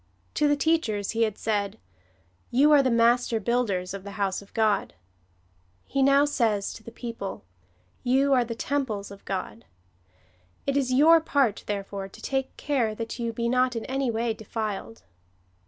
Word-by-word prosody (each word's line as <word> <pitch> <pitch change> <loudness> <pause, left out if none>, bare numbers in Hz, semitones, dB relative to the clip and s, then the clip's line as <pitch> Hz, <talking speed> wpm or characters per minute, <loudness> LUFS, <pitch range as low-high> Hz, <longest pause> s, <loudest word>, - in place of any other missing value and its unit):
To 300 - +2
the 290 - +3
teachers 280 -10 0
he 230 - -1
had 215 -2 +1
said, 205 -2 -1 0.4
" - - -38 0.3
You 280 +5 +4
are 290 -2 +7
the 260 - +1
master 235 0 +3
builders 205 -5 -1
of 195 -1 -6
the 200 0 -8
house 195 -2 -1
of 200 - -17
God." 215 -2 +1 0.9
He 275 - -1
now 275 +1 +5
says 225 -8 0
to - - -11
the 230 - -9
people, 230 - -6 0.3
" 90 0 -38
You 275 0 +3
are 250 -2 +4
the 230 -1 -5
temples 230 -7 -2
of 200 - -12
God. 185 - -4 1.0
It 275 - 0
is 270 -2 +1
your 320 +5 +6
part, 275 -9 +1
therefore, 200 -1 -4
to 195 - -15
take 270 -1 -3
care 245 -7 0
that 230 +2 -5
you 235 -1 -1
be 235 +1 -2
not 250 0 +2
in 230 - -3
any 270 -1 -1
way 230 0 0
defiled." 220 0 -5
230 Hz, 175 wpm, -26 LUFS, 205-265 Hz, 1.0 s, are